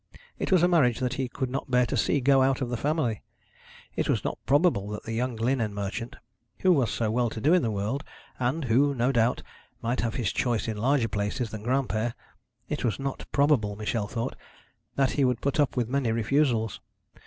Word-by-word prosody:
It - - -2
was 180 -3 +5
a - - +6
marriage 150 -10 +3
that 130 -1 -1
he 130 -1 -2
could 130 0 -3
not 135 0 -3
bear 125 -1 +4
to - - -3
see 145 - +1
go 135 +1 +4
out 135 0 +2
of 130 -3 -2
the - - 0
family. 140 -4 -1 0.7
It - - -1
was - - +1
not - - -3
probable 145 - +3
that 105 0 -5
the 115 - -5
young 125 +1 -1
linen 115 -2 0
merchant, 115 +5 -4 0.5
who 185 -1 +5
was 135 -8 +2
so 110 -2 -1
well 120 +1 +1
to 110 - -6
do 150 +9 +3
in 180 - +5
the 115 - 0
world, 110 +7 -2 0.4
and 130 +5 0
who, 135 +4 +3
no 125 +2 +2
doubt, 120 -1 +1 0.4
might 120 +2 -1
have 115 -1 -2
his 115 -6 -1
choice 120 -3 0
in 110 - -2
larger 125 +2 +2
places 105 +3 -2
than 110 - -6
Granpere 120 -2 0 0.5
it - - -3
was 115 - 0
not 135 0 -4
probable, 140 -8 +2
Michel 105 0 -2
thought, 115 +1 -3 0.6
that 135 -1 +2
he 140 - +1
would 125 -3 +2
put 140 +2 -1
up 145 -3 +2
with 120 -2 +1
many 130 -2 0
refusals. 115 -1 +1
125 Hz, 210 wpm, -27 LUFS, 115-135 Hz, 0.7 s, a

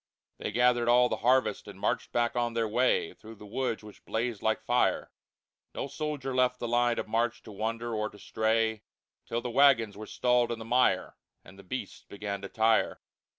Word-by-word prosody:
They - - -3
gathered 120 -1 +3
all 125 +1 +5
the - - -1
Harvest, 130 +2 +2
and - - -10
marched - - -1
back 120 0 0
on 120 -1 -1
their 115 -1 +1
Way 120 -4 +1
Through 110 +1 -13
the 105 - -13
Woods 115 +1 -2
which 105 -1 -13
blazed 115 -2 -2
like 110 0 +1
Fire. 120 +2 +1 0.6
No - - -2
Soldier 140 -1 -4
left 125 0 +2
the 120 - -4
Line 120 0 +2
of - - -3
march 115 +2 -1
to - - -11
wander 115 +3 -3
or 105 -1 -1
to - - -15
stray, 110 +1 0 0.5
Till 115 - -2
the 120 - -4
Wagons 120 -6 +4
were 105 +1 -8
stalled 125 -1 +2
in 120 - -2
the 110 - -8
Mire, 125 +2 +2 0.3
And 95 +3 -15
the - - -12
Beasts 105 +1 -6
began 100 -1 -5
to 100 - -7
tire. 110 0 +2
115 Hz, 195 wpm, -29 LUFS, 110-125 Hz, 0.6 s, all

